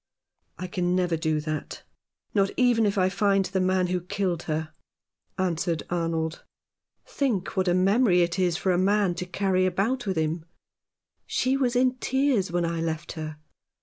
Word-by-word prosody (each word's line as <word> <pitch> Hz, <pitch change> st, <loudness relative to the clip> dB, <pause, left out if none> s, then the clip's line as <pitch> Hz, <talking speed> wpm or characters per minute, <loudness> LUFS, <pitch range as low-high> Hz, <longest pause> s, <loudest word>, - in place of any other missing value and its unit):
"I 185 Hz, -, -5 dB
can 180 Hz, 0 st, -1 dB
never 180 Hz, -2 st, +1 dB
do 160 Hz, -1 st, 0 dB
that, 155 Hz, 0 st, -5 dB, 0.5 s
not 195 Hz, -2 st, +3 dB
even 240 Hz, -4 st, +4 dB
if 200 Hz, -, -1 dB
I 185 Hz, -1 st, +4 dB
find 195 Hz, 0 st, +2 dB
the 190 Hz, +1 st, -1 dB
man 185 Hz, 0 st, +2 dB
who 180 Hz, 0 st, -1 dB
killed 180 Hz, -2 st, -2 dB
her," 155 Hz, 0 st, -2 dB, 0.6 s
answered 170 Hz, -3 st, -1 dB
Arnold. 165 Hz, -1 st, -2 dB, 0.3 s
" -, -, -64 dB, 0.2 s
Think 265 Hz, -, -1 dB
what 190 Hz, -1 st, +1 dB
a 175 Hz, -, +3 dB
memory 190 Hz, 0 st, +4 dB
it 170 Hz, +2 st, -2 dB
is 175 Hz, -2 st, +2 dB
for 190 Hz, -, 0 dB
a 175 Hz, -, +2 dB
man 200 Hz, -1 st, +2 dB
to 180 Hz, +1 st, -5 dB
carry 185 Hz, 0 st, +1 dB
about 215 Hz, +7 st, -1 dB
with 190 Hz, -3 st, -1 dB
him. 160 Hz, +1 st, -1 dB, 0.8 s
She 260 Hz, +1 st, +1 dB
was 255 Hz, -3 st, 0 dB
in 255 Hz, 0 st, +2 dB
tears 260 Hz, -8 st, +1 dB
when 175 Hz, 0 st, 0 dB
I 165 Hz, 0 st, -2 dB
left 160 Hz, -1 st, -3 dB
her. 155 Hz, -2 st, -6 dB
185 Hz, 175 wpm, -26 LUFS, 170-200 Hz, 0.8 s, even